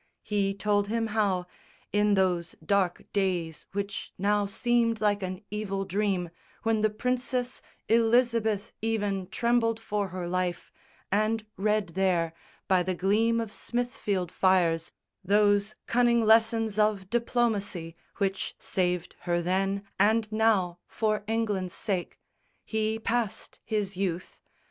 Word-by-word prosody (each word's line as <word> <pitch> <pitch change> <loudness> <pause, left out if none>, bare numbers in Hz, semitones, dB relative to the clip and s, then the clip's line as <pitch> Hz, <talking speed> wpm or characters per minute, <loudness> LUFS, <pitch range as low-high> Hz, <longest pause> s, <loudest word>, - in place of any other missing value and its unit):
He 200 -2 0
told 205 0 +1
him 225 +1 0
how, 195 -5 +1 0.5
in 205 0 +3
those 180 -3 +1
dark 195 -1 +1
days 180 -5 -1
which 200 0 -4
now 205 +1 +2
Seemed 230 +1 +1
like 205 -1 +2
an 185 +1 -5
evil 195 -2 -2
dream, 190 -3 -1 0.3
when 225 -1 +2
the 215 - +3
Princess 250 +2 -2 0.3
Elizabeth 230 -2 +2
even 205 -4 -1
trembled 230 +1 +1
for 210 -2 -2
her 180 -1 -5
life 180 0 -2 0.4
And 215 +2 +1
read 210 -1 +1
there, 175 -2 +1 0.3
by 185 -2 +4
the 185 +1 -1
gleam 220 +6 +2
of 225 -2 -4
Smithfield 210 -8 -2
fires, 175 -4 +2 0.3
Those 205 +1 +3
cunning 235 -1 +3
lessons 225 -1 +4
of 210 -3 +2
diplomacy 220 -8 0 0.2
Which 195 -1 -1
saved 180 -2 -1
her 175 0 +3
then 195 +3 0 0.2
and 215 +2 +3
now 210 -6 +2
for 215 -2 -1
England's 210 -5 -1
sake, 190 -5 -3 0.5
He 220 0 0
passed 225 -1 -2
his 210 -3 -2
youth. 185 -2 -3
205 Hz, 125 wpm, -28 LUFS, 185-225 Hz, 0.5 s, by